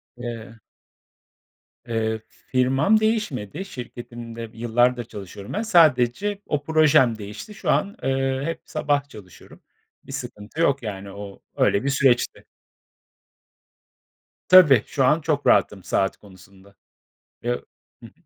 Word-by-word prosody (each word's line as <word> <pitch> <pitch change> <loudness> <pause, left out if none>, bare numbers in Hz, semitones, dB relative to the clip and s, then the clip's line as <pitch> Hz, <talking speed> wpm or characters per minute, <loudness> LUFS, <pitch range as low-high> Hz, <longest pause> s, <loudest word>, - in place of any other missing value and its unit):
Eee 115 -2 -8 1.3
Eee, 110 -1 -2 0.3
firmam 135 +11 +3
değişmedi, 195 - -2
şirketimde 120 - -8
yıllardır 120 +2 +1
çalışıyorum 100 -1 -9
ben. 210 - -1
Sadece 170 - +3
o 145 -1 -1
projem 150 -7 +4
değişti. 105 - -9
Şu 220 - -5
an, 200 +1 +1
ııı, 135 0 0
hep 165 -1 -4
sabah 145 -2 -1
çalışıyorum. 95 -7 -14 0.4
Bir - - -12
sıkıntı 105 +10 -6
yok, 140 -5 +2
yani, 100 -2 -6
o 100 0 -10
öyle 100 - +2
bir 140 - 0
süreçti. 135 -3 +1 2.0
Tabii 160 - +8
şu 135 - +1
an 150 +5 +3
çok 150 -2 -1
rahatım 100 -3 +3
saat 95 +2 0
konusunda. 95 0 -18 0.7
Ya - - 0 0.5
hı - - -9
hı. - - -16
125 Hz, 120 wpm, -23 LUFS, 110-150 Hz, 2.0 s, Tabii